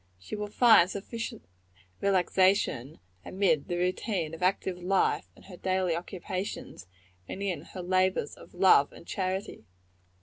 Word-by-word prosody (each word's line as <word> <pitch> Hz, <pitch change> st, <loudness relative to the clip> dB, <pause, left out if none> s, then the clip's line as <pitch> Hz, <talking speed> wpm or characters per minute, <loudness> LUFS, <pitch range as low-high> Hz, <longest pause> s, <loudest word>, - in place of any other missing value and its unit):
She 95 Hz, -, -7 dB
will 210 Hz, 0 st, -4 dB
find 215 Hz, -5 st, +6 dB
sufficient 215 Hz, -, -6 dB, 0.6 s
relaxation 185 Hz, -, +2 dB, 0.2 s
amid 185 Hz, -6 st, +1 dB
the 175 Hz, -, -2 dB
routine 180 Hz, -2 st, -1 dB
of 165 Hz, -, -8 dB
active 185 Hz, 0 st, 0 dB
life 190 Hz, +2 st, +1 dB
and -, -, -18 dB
her 185 Hz, -2 st, -11 dB
daily 185 Hz, -2 st, 0 dB
occupations, 180 Hz, -, -6 dB, 0.4 s
and 195 Hz, -, -5 dB
in 190 Hz, -3 st, -2 dB
her 185 Hz, -, -9 dB
labors 185 Hz, -4 st, +1 dB
of -, -, -15 dB
love 180 Hz, -6 st, +5 dB
and -, -, -13 dB
charity. 190 Hz, -, -3 dB
185 Hz, 135 wpm, -29 LUFS, 175-195 Hz, 0.6 s, find